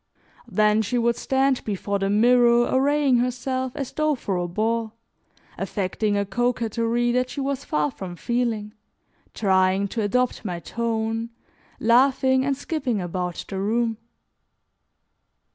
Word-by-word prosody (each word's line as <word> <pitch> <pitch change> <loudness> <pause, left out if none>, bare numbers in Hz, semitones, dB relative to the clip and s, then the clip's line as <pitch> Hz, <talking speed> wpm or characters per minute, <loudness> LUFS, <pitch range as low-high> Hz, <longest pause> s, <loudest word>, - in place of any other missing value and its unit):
Then 215 0 +3
she 230 +3 -1
would 235 0 +2
stand 265 +1 +1
before 200 -1 -2
the 195 0 0
mirror 240 +3 +5
arraying 275 0 +3
herself 255 +1 -1
as 275 -3 -4
though 305 -1 +1
for 200 -6 -3
a 175 0 -1
ball, 220 +4 -1 0.7
affecting 205 +1 -1
a 200 - 0
coquetry 240 +1 0
that 250 +1 0
she 285 - -6
was 275 0 -2
far 150 -1 0
from 180 +2 -7
feeling, 230 -1 -2 0.6
trying 190 0 +2
to 225 - -2
adopt 250 +4 0
my 180 -5 -4
tone, 225 +2 -2 0.5
laughing 260 +2 +3
and 275 0 0
skipping 275 -7 -2
about 180 -1 -4
the 195 - -4
room. 225 +2 0
230 Hz, 130 wpm, -24 LUFS, 205-250 Hz, 0.7 s, mirror